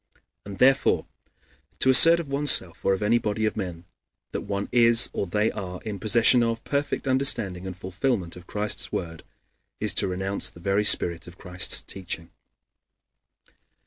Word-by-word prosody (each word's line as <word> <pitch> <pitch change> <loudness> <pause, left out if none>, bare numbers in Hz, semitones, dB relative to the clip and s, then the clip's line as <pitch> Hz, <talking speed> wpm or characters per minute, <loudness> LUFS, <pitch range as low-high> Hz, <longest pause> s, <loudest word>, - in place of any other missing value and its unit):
And 100 -1 -9
therefore, 135 +4 +2 0.7
to 130 - +3
assert 165 +6 +7
of 165 - -6
one's 140 +1 -1
self 85 - 0
or 95 - +2
of 95 - -6
any 115 +3 +2
body 110 0 -2
of 110 - -2
men, 90 -4 -6 0.5
that - - -4
one 100 0 -4
is 120 -1 +5
or 100 - -3
they 105 +4 0
are 90 -3 -7
in 105 -3 -6
possession 115 +4 +4
of 115 -1 -2
perfect 140 -1 -3
understanding 115 -9 0
and 90 -1 -8
fulfillment 95 0 -3
of 90 0 -14
Christ's 105 0 -1
word, 80 -1 -5 0.6
is - - +2
to - - +1
renounce 95 +2 -1
the - - -16
very 100 +4 -1
spirit 85 -4 +2
of 90 +1 -14
Christ's 90 -1 0
teaching. 85 -3 -7
100 Hz, 165 wpm, -24 LUFS, 90-120 Hz, 0.7 s, assert